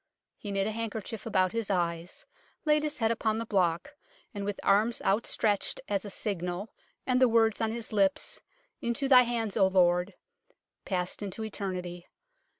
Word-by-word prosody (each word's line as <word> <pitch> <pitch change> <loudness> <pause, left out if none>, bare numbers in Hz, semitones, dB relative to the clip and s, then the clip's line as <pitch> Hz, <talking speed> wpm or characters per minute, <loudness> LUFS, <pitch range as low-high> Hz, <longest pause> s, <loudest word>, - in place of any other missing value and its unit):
He 205 - -6
knit 195 0 0
a 220 - -1
handkerchief 225 -1 -5
about 185 -4 +2
his 230 -2 -2
eyes, 170 -2 -2 0.4
laid 300 0 +4
his 300 0 -3
head 225 -1 +2
upon 220 -1 0
the 230 - -3
block, 185 - 0 0.4
and 200 -2 -4
with 205 0 -3
arms 215 +4 +3
outstretched 205 0 +1
as 200 0 -1
a - - -5
signal 190 0 -3 0.3
and 255 0 +2
the 255 - +6
words 225 -1 +3
on 220 -1 +1
his 230 -1 -5
lips, 195 -2 +1 0.2
" - - -43
Into 235 +3 -1
Thy 255 -2 +8
hands, 235 -4 -1
O 195 -3 +5
Lord," 180 0 +2 0.7
passed 180 -1 -2
into 205 +2 -5
eternity. 180 -4 -5
205 Hz, 165 wpm, -29 LUFS, 190-230 Hz, 0.7 s, Thy